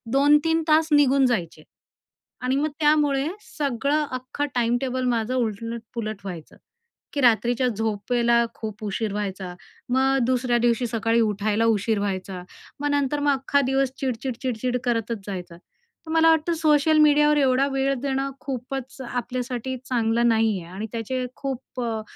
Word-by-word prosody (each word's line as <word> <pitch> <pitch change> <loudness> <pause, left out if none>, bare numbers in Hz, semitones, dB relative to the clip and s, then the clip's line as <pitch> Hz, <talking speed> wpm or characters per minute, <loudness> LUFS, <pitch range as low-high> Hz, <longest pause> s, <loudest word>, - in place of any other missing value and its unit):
2-3 295 +4 +4
तास 315 0 +4
निघून 275 -2 +5
जायचे 175 -10 -1 0.8
आणि 255 +1 +1
मग 300 +2 0
त्यामुळे 295 -2 +3 0.3
सगळं 285 +2 0
अख्खं 255 +3 -3
टाईमटेबल 250 +2 0
माझं 235 0 0
उलट-पुलट 230 -1 -3
व्हायचं, 175 -5 -8 0.6
की 285 - 0
रात्रीच्या 240 0 +3
झोपेला 235 +2 +1
खूप 215 -1 -7
उशीर 210 +1 -2
व्हायचा 195 -3 -4 0.4
.मग 265 +1 +3
दुसऱ्या 250 -1 +1
दिवशी 240 +1 +1
सकाळी 230 0 +1
उठायला 215 0 +1
उशीर 210 +1 0
व्हायचा. 190 -2 -3 0.4
मग 290 - 0
नंतर 285 0 +1
मग 290 0 +3
अख्खा 275 +1 +1
दिवस 270 0 +1
चिडचिड-चिडचिड 250 -1 -2
करतच 230 -2 -1
जायचा, 180 -4 -6
तर 345 - -18
मला 325 0 +5
वाटतं 320 +1 +2
सोशल 310 0 +4
मीडियावर 295 0 +5
एवढा 270 -1 +3
वेळ 270 0 +1
देणं 275 0 -1
खूपच 265 0 -6
आपल्यासाठी 250 +1 -3
चांगलं 235 -1 +1
नाही 220 -3 +2
आहे, 170 +1 -12
आणि 210 +3 -4
त्याचे 250 +3 -3
खूप 265 -2 -5
अ, 225 -2 -2
250 Hz, 140 wpm, -24 LUFS, 225-275 Hz, 0.8 s, निघून